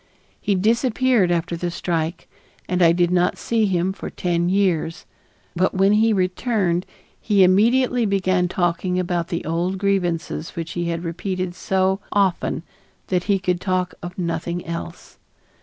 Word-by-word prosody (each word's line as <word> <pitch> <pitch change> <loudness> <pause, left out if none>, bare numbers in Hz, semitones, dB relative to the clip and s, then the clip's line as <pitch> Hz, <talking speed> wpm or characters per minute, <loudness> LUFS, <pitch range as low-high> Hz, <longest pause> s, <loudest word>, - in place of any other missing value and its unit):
He 200 - +1
disappeared 230 0 +2
after 170 0 -1
the 175 +1 -3
strike 165 -1 -3 0.4
and 180 0 0
I 165 -1 +7
did 175 0 +2
not 180 0 +2
see 225 -2 +1
him 185 0 0
for - - -7
ten 175 -1 -1
years, 175 -4 0 0.5
but 185 +2 +1
when 195 +2 +4
he 220 +2 +4
returned 185 -2 0 0.3
he 205 -3 +4
immediately 235 +5 +3
began 185 -2 +1
talking 175 0 0
about 175 -2 -1
the 170 - -4
old 170 +4 -1
grievances 175 -4 -1
which 165 -1 -4
he 175 0 -2
had 170 0 -2
repeated 185 +1 -3
so 190 +1 0
often 190 -4 +1 0.5
that 180 -1 0
he 200 -1 +2
could 180 -1 -1
talk 185 -1 -1
of 175 +1 -8
nothing 170 0 -3
else. 170 +1 -7
180 Hz, 150 wpm, -22 LUFS, 175-195 Hz, 0.5 s, I